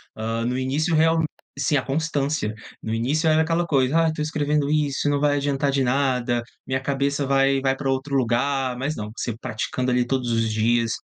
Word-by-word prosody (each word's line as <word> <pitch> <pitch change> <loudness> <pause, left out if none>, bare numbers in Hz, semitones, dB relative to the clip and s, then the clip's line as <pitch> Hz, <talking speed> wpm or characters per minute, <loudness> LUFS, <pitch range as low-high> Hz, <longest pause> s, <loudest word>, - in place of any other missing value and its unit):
Ah, 115 +1 -2
no 125 +1 -1
início 140 +6 0
real 160 +1 +4 0.4
sim, 145 - +1
a - - +1
constância. 140 -4 -1 0.3
No 110 - -3
início 145 +8 +1
era 155 0 +4
aquela 165 +2 +1
coisa: 145 +1 +2
"Ah, - - +3
estou 155 -1 -2
escrevendo 150 -1 0
isso, 145 -1 +1
não 145 - +1
vai 145 0 +2
adiantar 140 0 0
de 135 -1 +1
nada. 125 -2 +1 0.2
Minha 130 0 0
cabeça 140 +1 0
vai 135 0 +3
vai 135 0 +1
pra 135 - -3
outro 135 +1 -1
lugar". 130 +1 +1
Mas 140 +4 -2
não, 105 0 -5
você 120 - -3
praticando 125 +3 -2
ali 125 0 +2
todos 125 -2 -1
os 115 -1 +1
dias, 115 +1 +1
135 Hz, 195 wpm, -23 LUFS, 125-145 Hz, 0.4 s, real